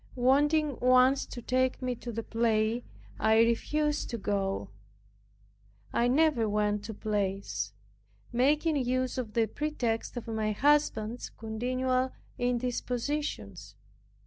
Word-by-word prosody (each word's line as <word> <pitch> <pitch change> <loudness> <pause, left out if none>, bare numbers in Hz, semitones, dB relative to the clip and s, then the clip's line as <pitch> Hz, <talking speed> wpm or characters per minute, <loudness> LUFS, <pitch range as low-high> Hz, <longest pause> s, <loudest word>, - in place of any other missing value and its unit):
Wanting 290 +3 +3
once 255 +2 +4
to 240 - -8
take 255 +1 +1
me 255 -1 -1
to 240 0 -7
the 230 0 -4
play, 225 0 +1 0.4
I 220 0 +4
refused 295 +6 +1
to 235 - -3
go; 195 - -2 1.2
(I 240 - +2
never 265 -4 +3
went 210 0 0
to 220 -1 -6
plays) 195 - -2 0.6
making 295 +5 +2
use 255 0 0
of 220 -4 -5
the 230 -1 +3
pretext 245 -3 -2
of 235 - -6
my 220 -1 -1
husband's 245 -4 +1
continual 255 +3 -1 0.3
indispositions. 245 - -2
245 Hz, 115 wpm, -29 LUFS, 220-260 Hz, 1.2 s, once